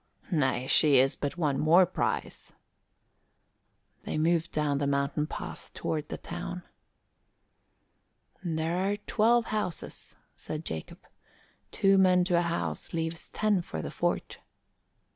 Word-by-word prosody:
"Nay, 130 -6 +1
she 145 +1 +5
is 135 +1 +4
but 145 +3 -4
one 145 -5 +1
more 170 +4 +6
prize." 180 - -3 1.5
They - - -4
moved 165 +1 +1
down 145 -2 0
the 140 - 0
mountain 140 +2 0
path - - -7
toward 155 -1 -3
the - - -4
town. 175 +1 -6 1.8
"There 165 0 -1
are 195 +2 0
twelve 230 +3 +2
houses," 210 -6 -2 0.2
said 155 +1 -6
Jacob. 80 -1 -6 0.7
"Two 195 0 +4
men 185 -1 +5
to 175 -1 +2
a - - +2
house 170 -1 -3
leaves 165 0 -2
ten 210 -3 +1
for 80 - -6
the - - -5
fort." - - -2
165 Hz, 125 wpm, -29 LUFS, 150-180 Hz, 1.8 s, more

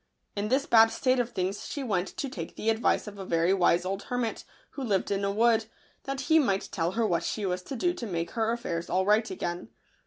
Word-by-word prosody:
In 205 +1 -1
this 265 +5 +1
bad 225 -1 +7
state 255 +2 +1
of 240 -1 0
things 190 -2 -3
she 285 - -4
went 195 -6 0
to 280 - -4
take 170 -10 -7
the 225 - +1
advice 225 +1 +1
of 205 -2 -9
a - - -4
very 170 0 +2
wise 175 -2 +3
old 195 +1 -2
hermit, 245 -2 -2 0.3
who 280 - -7
lived 200 -6 0
in 200 0 0
a 200 - +1
wood, 225 +1 +3 0.4
that 275 0 -3
he 320 +4 +4
might 200 -9 0
tell 170 0 -1
her 230 0 +1
what 170 -5 +1
she 210 - -2
was 180 -1 -1
to 270 - -7
do 350 +8 +1
to 235 - -6
make 170 -3 -3
her 225 -1 0
affairs 170 -8 -3
all 185 +1 +1
right 215 +2 +3
again. 175 -8 -4
210 Hz, 240 wpm, -28 LUFS, 185-235 Hz, 0.4 s, bad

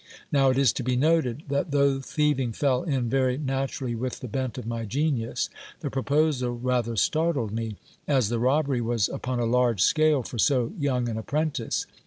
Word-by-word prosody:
Now 135 -2 +4
it 130 - +1
is 135 -5 +4
to 130 - -3
be 125 +1 0
noted, 150 -1 +1
that 140 +4 0
though 140 -1 +2
thieving 135 -3 0
fell 130 0 +1
in 135 -7 -1
very 130 +1 +1
naturally 135 -3 -2
with 125 +2 -4
the 130 - -5
bent 130 +1 -3
of 125 - -6
my 115 0 -3
genius, 130 +1 -1 0.3
the - - -3
proposal 140 -2 +1
rather 120 -2 0
startled 150 - +1
me, 110 -1 -3 0.3
as 130 -7 +2
the 120 0 -1
robbery 135 +1 +1
was 115 -3 0
upon 125 -1 -3
a 120 - +1
large 120 -4 +2
scale 155 -4 +3
for 120 - -7
so 125 - +2
young 130 -4 0
an 110 -1 -3
apprentice. 145 -1 -1
130 Hz, 185 wpm, -26 LUFS, 120-140 Hz, 0.3 s, Now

